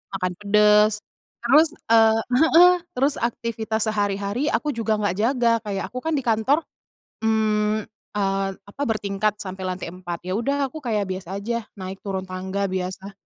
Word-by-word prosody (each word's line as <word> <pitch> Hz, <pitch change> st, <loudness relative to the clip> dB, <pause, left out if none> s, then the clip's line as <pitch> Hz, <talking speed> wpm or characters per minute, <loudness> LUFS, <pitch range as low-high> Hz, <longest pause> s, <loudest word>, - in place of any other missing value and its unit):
makan 185 Hz, -1 st, -1 dB
pedes 210 Hz, +1 st, +4 dB, 0.4 s
terus, 295 Hz, +7 st, +6 dB, 0.2 s
eee 225 Hz, -1 st, +5 dB, 0.2 s
heeh, 310 Hz, +6 st, +5 dB, 0.5 s
terus 275 Hz, +3 st, +2 dB
aktivitas 225 Hz, -1 st, -2 dB
sehari-hari 205 Hz, +5 st, -1 dB
aku 300 Hz, -, 0 dB
juga 220 Hz, -2 st, 0 dB
nggak 205 Hz, -3 st, 0 dB
jaga 235 Hz, +1 st, +2 dB
kayak 195 Hz, -2 st, -3 dB
aku -, -, -5 dB
kan 320 Hz, -, -1 dB
di -, -, 0 dB
kantor, 230 Hz, +6 st, +2 dB, 0.7 s
mmm, 215 Hz, -1 st, +1 dB, 0.3 s
eee, 195 Hz, -1 st, 0 dB, 0.2 s
apa 240 Hz, -, -9 dB
bertingkat 210 Hz, -2 st, -1 dB
sampai 190 Hz, -1 st, -6 dB
lantai 185 Hz, -2 st, -4 dB
4 175 Hz, -1 st, -6 dB
ya 185 Hz, -, 0 dB
udah 275 Hz, +4 st, 0 dB
aku 315 Hz, -, -9 dB
kayak 210 Hz, -5 st, -1 dB
biasa 190 Hz, +1 st, -5 dB
aja 235 Hz, +1 st, -3 dB
naik 190 Hz, +1 st, -6 dB
turun 190 Hz, -1 st, -2 dB
tangga 190 Hz, +2 st, -3 dB
biasa. 185 Hz, +1 st, -4 dB
210 Hz, 155 wpm, -23 LUFS, 195-230 Hz, 0.7 s, terus